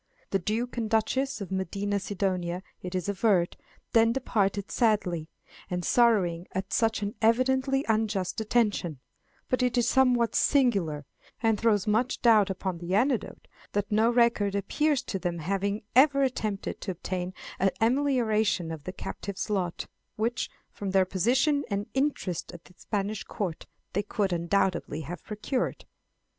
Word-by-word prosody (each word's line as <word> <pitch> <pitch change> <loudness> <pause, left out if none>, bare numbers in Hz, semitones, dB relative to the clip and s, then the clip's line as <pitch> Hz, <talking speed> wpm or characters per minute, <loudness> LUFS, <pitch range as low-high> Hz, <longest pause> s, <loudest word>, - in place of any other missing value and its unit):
The 195 - +2
Duke 225 +7 -2
and 225 -2 -1
Duchess 225 +2 0
of 190 - -6
Medina 200 +2 -1
Sidonia, 185 -2 -2 0.2
it 180 0 -5
is 185 0 -2
averred, 195 -3 +2 0.4
then 230 0 +5
departed 205 -6 0
sadly, 185 -9 +1 0.4
and 180 -2 -2
sorrowing 190 -8 +3
at 190 +1 -3
such 225 -2 +1
an 205 +1 -2
evidently 260 +4 +2
unjust 215 -4 0
detention; 210 - 0 0.5
but 255 - 0
it 250 -1 +1
is 240 - +3
somewhat 250 -3 +3
singular, 195 - +2 0.4
and 225 -2 +3
throws 210 -4 +2
much 225 +4 +1
doubt 220 -4 +6
upon 190 -2 -3
the 175 +2 -2
anecdote, 240 0 0 0.3
that 205 +1 -1
no 220 +2 +4
record 235 -4 +3
appears 285 +8 +1
of 195 - -2
them 175 -2 -2
having 200 +5 -1
ever 275 +1 +6
attempted 215 -6 -2
to - - -5
obtain 180 0 -3 0.3
an 195 - +4
amelioration 225 - +2
of 155 -3 -7
the 185 - -3
captive's 200 +2 -5
lot, 180 -4 -1 0.3
which, 230 +3 -1 0.2
from 200 - -5
their 190 0 +4
position 255 - +2
and 200 0 -1
interest 265 - -1
at 170 -1 -11
the 180 - -17
Spanish 205 +1 -3
court, 180 -6 -4 0.3
they 200 - +1
could, 200 -2 -1
undoubtedly, 175 -2 0
have 160 +2 -7
procured. 215 +5 -3
205 Hz, 150 wpm, -28 LUFS, 185-235 Hz, 0.5 s, doubt